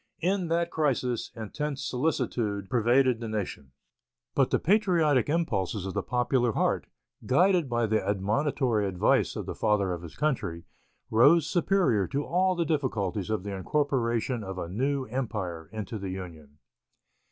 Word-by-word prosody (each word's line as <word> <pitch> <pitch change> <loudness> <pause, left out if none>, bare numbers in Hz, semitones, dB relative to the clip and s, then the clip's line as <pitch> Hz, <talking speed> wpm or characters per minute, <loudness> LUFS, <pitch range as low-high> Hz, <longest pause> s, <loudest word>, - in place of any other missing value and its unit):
In 185 0 +1
that 170 +1 0
crisis 125 -6 0
intense 140 +6 -4
solicitude 120 -8 -1
pervaded 125 +1 +3
the 115 - -5
nation. 100 -11 -4 0.6
But - - +2
the - - +2
patriotic 165 - +2
impulses 105 - -1
of 95 - -4
the - - -1
popular 125 -1 +1
heart, - - 0 0.4
guided 175 +2 +3
by 120 -1 +1
the 110 0 +1
admonitory 110 +2 0
advice 90 -2 +2
of - - -4
the - - -4
Father 100 -3 +1
of 85 - -5
his 85 -2 -10
Country, 125 - -1 0.5
rose 145 +8 +6
superior 170 - +2
to 140 +8 -2
all 185 +2 +2
the 170 -1 0
difficulties 110 - -1
of 110 -4 -1
the 100 0 -5
incorporation 120 0 0
of 95 -1 -6
a 85 - -4
new 135 +8 -1
empire 105 -10 -4
into 110 0 -5
the 95 -1 -5
Union. 80 -6 -8
120 Hz, 150 wpm, -28 LUFS, 100-150 Hz, 0.6 s, rose